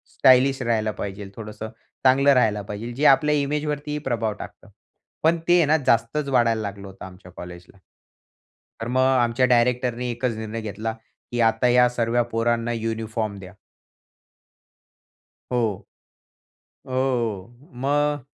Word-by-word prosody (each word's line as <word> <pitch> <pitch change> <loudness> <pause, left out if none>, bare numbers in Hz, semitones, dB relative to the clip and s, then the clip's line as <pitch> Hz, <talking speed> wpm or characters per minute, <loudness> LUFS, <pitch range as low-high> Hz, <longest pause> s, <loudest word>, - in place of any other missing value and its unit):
Stylish 130 +1 +4
राहायला 110 -3 0
पाहिजे. 100 -1 -6
थोडंसं 105 0 -7 0.3
चांगलं 135 +2 +5
राहायला 110 -5 +2
पाहिजे. 105 +4 -6
जे 145 +5 -1
आपल्या 150 +2 +5
इमेज 145 +1 -1
वरती 150 0 -3
प्रभाव 115 -2 -1
टाकतं. - - -11 0.5
पण 165 +2 +4
ते 175 - +5
आहे 170 - +4
ना, 155 +2 +3
जास्तच 125 +6 +1
वाढायला 115 -4 +2
लागलं 100 -1 -6
होतं 95 - -10
आमच्या 90 0 -13
कॉलेजला. 90 +2 -11 1.0
तर 115 - -3
मग 130 +1 +1
आमच्या 130 -1 +3
डायरेक्टरने 125 0 +1
एकच 120 0 -2
निर्णय 110 +1 -5
घेतला, 110 +1 -4 0.4
की 120 - -3
"आता 115 +1 +3
या 125 0 +5
सर्व्या 120 0 0
पोरांना 115 +1 0
युनिफॉर्म 110 -2 -3
द्या." 95 0 -11 2.0
हो. 115 -5 -1 1.0
हो, 130 - -7
हो. 120 - -2
मग 145 0 +1
120 Hz, 135 wpm, -23 LUFS, 110-130 Hz, 2.0 s, चांगलं